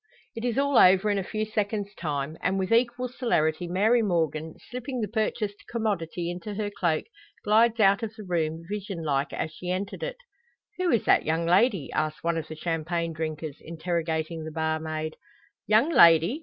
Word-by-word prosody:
It 230 - -5
is 245 -1 -1
all 280 -2 +4
over 190 +3 +6
in 200 - +1
a - - -2
few 215 +3 -3
seconds' 210 -1 -2
time; 150 -3 -3
and 190 - 0
with 190 +2 -2
equal 240 +2 +2
celerity 175 -10 0
Mary 210 +7 +3
Morgan, 160 -5 -1
slipping 250 +1 -6
the 215 - -1
purchased 215 -1 -2
commodity 175 -7 -2
into 180 +4 -6
her 205 0 -2
cloak, 175 -6 0 0.4
glides 225 +2 +4
out 200 -1 +5
of 225 -1 -5
the 215 - -9
room 165 -3 -1
vision 200 -3 -5
like 140 -2 0
as 160 - -3
she 180 +3 -7
entered 190 +2 -3
it. - - -4 0.6
"Who 365 -1 +1
is 235 - +2
that - - +4
young 160 +2 0
lady?" 190 - +3
asks 155 0 -2
one 170 0 +1
of 155 - -7
the 160 - -7
champagne 165 +1 -2
drinkers, 155 -1 -4
interrogating 165 -1 -3
the 160 - -5
barmaid. 160 0 -3 0.5
"Young 220 +10 +4
lady!" 170 - +6
180 Hz, 180 wpm, -27 LUFS, 160-215 Hz, 0.6 s, over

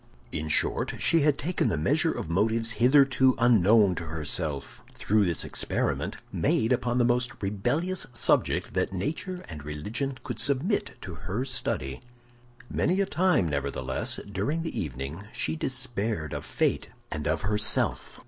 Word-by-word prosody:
In 80 0 -3
short, - - +1
she 165 - +3
had 150 -1 +3
taken 175 +4 0
the 80 - 0
measure 75 - +2
of - - -5
motives 110 +6 +2
hitherto 130 +1 +4
unknown 110 -4 +5
to 85 -1 -5
herself, 75 -2 -3
through 105 0 +2
this 85 -4 +1
experiment, - - -1
made 110 +3 +1
upon 120 -1 0
the 120 - +4
most 125 +2 0
rebellious 125 - -1
subject 120 - +1
that - - 0
nature 160 - -3
and 75 -3 -8
religion 105 - -3
could - - -5
submit 145 - +1
to 95 - -7
her 90 - -4
study. 95 - -2 0.7
Many 185 +8 0
a 195 - +3
time, 185 - +2
nevertheless, 70 -3 -2
during 140 - -1
the 165 - -5
evening 70 +5 -6
she - - -1
despaired 115 - -2
of - - -5
fate - - 0 0.2
and 75 0 -3
of 80 0 0
herself. 105 +2 +2
110 Hz, 150 wpm, -27 LUFS, 80-130 Hz, 0.7 s, unknown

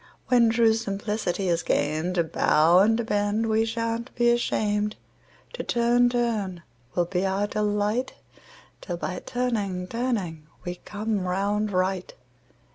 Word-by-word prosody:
When 240 -2 +5
true 225 -1 +4
simplicity 205 -3 -2
is 170 -1 +1
gain'd, 155 +5 0
To 170 - +3
bow 160 +2 +4
and 220 +3 +4
to 235 - -1
bend 205 +1 0
we 220 0 +2
shan't 230 +1 -2
be 240 0 +4
asham'd, 210 -3 0 0.6
To - - -4
turn, 240 +1 +3
turn 220 -8 -1 0.3
will 175 - +2
be 180 +1 -1
our 195 +1 +1
delight 210 +3 -1 0.7
'Till 175 -3 -4
by 180 +1 -4
turning, 210 -7 -2
turning 190 -9 -3 0.2
we 180 0 -4
come 210 -2 -2
round 205 +3 0
right. 185 0 -1
210 Hz, 135 wpm, -25 LUFS, 185-230 Hz, 0.7 s, When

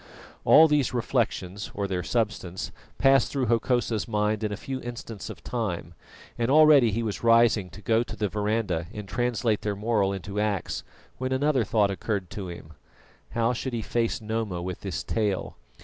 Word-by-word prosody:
All 160 +1 +8
these 145 -4 +1
reflections, 105 -6 -1
or 100 -1 -1
their 95 -2 -2
substance, 100 -3 -2 0.3
passed 135 -1 +4
through 135 -3 0
Hokosa's 115 -1 +1
mind 105 -1 0
in 105 - -1
a 105 - -3
few 130 +3 -5
instants 115 -3 -7
of - - -9
time, 95 -8 -3 0.5
and 115 +1 +1
already 150 -4 +7
he 115 +3 -1
was 110 -1 -4
rising 115 -4 +4
to 105 +4 -13
go 115 0 +3
to 120 - -5
the 105 - -1
verandah 105 -5 -1
and 105 -3 -7
translate 115 +2 0
their 105 -1 -2
moral 105 -2 +1
into 100 +1 -4
acts, 105 -3 -1 0.4
when 130 0 -2
another 135 -1 +2
thought 105 -1 +2
occurred 100 -2 -3
to 100 -3 -5
him 80 -2 -10 0.6
How 115 +1 +2
should 125 +1 -4
he 115 -2 -2
face 120 +2 -1
Noma 110 -4 -2
with 90 +1 -5
this 95 -3 -4
tale? 105 -4 -1
110 Hz, 175 wpm, -26 LUFS, 100-120 Hz, 0.6 s, All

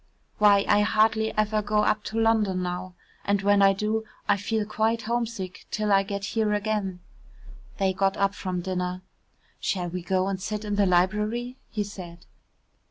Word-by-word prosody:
Why, 205 -1 +5
I 205 - +4
hardly 220 +1 +2
ever 215 0 +2
go 210 0 +1
up 210 0 +1
to 225 - -2
London 215 -5 +2
now, 180 +1 -4 0.3
and 200 -1 0
when 205 0 +4
I 195 0 +6
do, 215 +3 -1 0.2
I 205 - +4
feel 210 +2 -1
quite 220 +2 0
homesick 230 -5 -3
till 215 -1 -1
I 195 0 +6
get 200 0 -4
here 220 -2 +1
again." 205 -3 -2 0.8
They 195 -2 +1
got 195 +1 +1
up 200 0 +2
from 185 -3 -3
dinner. 180 0 -3 0.6
"Shall 180 -3 -1
we 180 +1 -4
go 185 +2 0
and 195 -1 -3
sit 210 +1 -4
in 205 - -2
the 200 -1 +3
library?" 210 +8 +1
he 210 - -2
said. 180 -4 -10
205 Hz, 170 wpm, -26 LUFS, 190-215 Hz, 0.8 s, I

